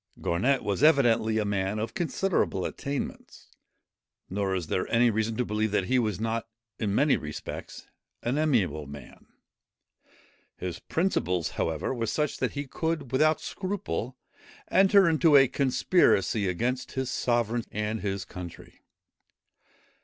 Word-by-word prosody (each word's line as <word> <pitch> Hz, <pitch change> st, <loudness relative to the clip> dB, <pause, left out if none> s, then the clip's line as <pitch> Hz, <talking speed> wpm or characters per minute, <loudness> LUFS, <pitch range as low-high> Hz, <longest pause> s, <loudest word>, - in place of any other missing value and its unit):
Garnet 125 Hz, +11 st, +1 dB
was 100 Hz, +2 st, -1 dB
evidently 120 Hz, -7 st, +4 dB
a 105 Hz, -, +1 dB
man 100 Hz, 0 st, -1 dB
of 110 Hz, +2 st, -3 dB
considerable 175 Hz, -, 0 dB
attainments; 140 Hz, -1 st, -5 dB, 0.8 s
nor 95 Hz, 0 st, -1 dB
is 90 Hz, -3 st, -2 dB
there 90 Hz, +4 st, -2 dB
any 115 Hz, 0 st, +4 dB
reason 110 Hz, +1 st, -1 dB
to 125 Hz, -, 0 dB
believe 110 Hz, 0 st, 0 dB
that 100 Hz, -2 st, 0 dB
he 130 Hz, +6 st, +2 dB
was 105 Hz, -5 st, -1 dB
not, 115 Hz, +1 st, -2 dB, 0.3 s
in 105 Hz, -3 st, -1 dB
many 145 Hz, +3 st, +4 dB
respects, 75 Hz, 0 st, -7 dB, 0.4 s
an 125 Hz, +5 st, 0 dB
amiable 95 Hz, -, +1 dB
man. 70 Hz, -3 st, -12 dB, 1.3 s
His 90 Hz, -2 st, -5 dB
principles 90 Hz, -, 0 dB
however, 80 Hz, +9 st, -2 dB
were 115 Hz, -3 st, -2 dB
such, 150 Hz, +3 st, -1 dB
that -, -, -1 dB
he 145 Hz, 0 st, -4 dB
could 155 Hz, -1 st, -3 dB
without 155 Hz, +4 st, +3 dB
scruple 155 Hz, -, -4 dB, 0.5 s
enter 195 Hz, 0 st, +6 dB
into 155 Hz, -1 st, +4 dB
a 135 Hz, -1 st, +6 dB
conspiracy 125 Hz, -, +2 dB
against 120 Hz, +8 st, -2 dB
his 130 Hz, -1 st, -2 dB
sovereign 120 Hz, -2 st, 0 dB
and 105 Hz, +1 st, -2 dB
his 100 Hz, -1 st, -3 dB
country. 90 Hz, -2 st, -10 dB
115 Hz, 135 wpm, -27 LUFS, 100-140 Hz, 1.3 s, enter